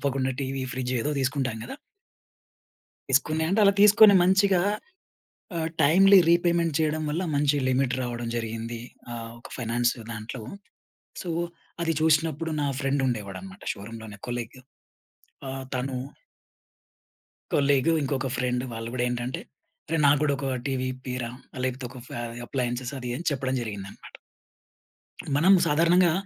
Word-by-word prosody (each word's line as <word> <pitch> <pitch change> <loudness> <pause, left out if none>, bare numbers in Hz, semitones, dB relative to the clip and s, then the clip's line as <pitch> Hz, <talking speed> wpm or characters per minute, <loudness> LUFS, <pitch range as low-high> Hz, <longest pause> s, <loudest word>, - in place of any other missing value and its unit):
తప్పకుండా 135 -1 0
TV, 135 0 -2
fridge 130 -1 -2
ఏదో 150 - -1
తీసుకుంటాం 130 -3 -1
కదా! - - -7 1.4
తీసుకుని 155 +4 +2
అంటే 195 +4 +2
అలా 200 0 +6
తీసుకొని 210 0 +8
మంచిగా 190 0 +4 0.9
ఆహ్, 160 -1 -1
టైమ్లీ 195 +7 +7
రీపేమెంట్ 170 -1 +3
చేయడం 155 0 +1
వల్ల 165 +5 -1
మంచి 145 0 +3
లిమిట్ 130 0 +1
రావడం 120 -1 -3
జరిగింది. 115 0 -4 0.3
ఆహ్, 115 -1 -6
ఒక - - -12
ఫైనాన్స్ 120 0 +1 0.2
దాంట్లో. 110 +2 -6 0.8
సో 180 - -5 0.5
అది 165 -1 +1
చూసినప్పుడు 160 0 +2
నా 145 - +1
ఫ్రెండ్ 140 0 0
ఉండేవాడన్నమాట 120 - -5
షోరూమ్‌లోనే 110 0 -9
కొలీగ్. 120 +1 -5 0.9
ఆహ్, 135 0 -5
తను 130 +1 -2 1.6
కొలీగ్ 140 +2 +3
ఇంకొక 135 -1 -1
ఫ్రెండ్ 125 0 0
వాళ్ళు 115 0 -5
కూడా 125 -1 0
ఏంటంటే, 125 +1 -3 0.5
రే 165 - +2
నాకు 140 0 +5
కూడా 145 -2 +2
ఒక 135 -1 -2
టివి 130 -1 -1
ఇప్పియ్యిర, 125 -1 -5 0.4
లేకపోతే 130 0 -2
ఒక 125 +1 -10
ఫే - - -7 0.3
అప్లయెన్స్ 125 0 -2
అది 125 -1 -4
అని 175 - -7
చెప్పడం 130 -1 -1
జరిగిందన్నమాట. 100 -4 -8 1.2
మనం 170 +7 +6
సాధారణంగా 170 +3 +4
135 Hz, 130 wpm, -26 LUFS, 120-160 Hz, 1.6 s, తీసుకొని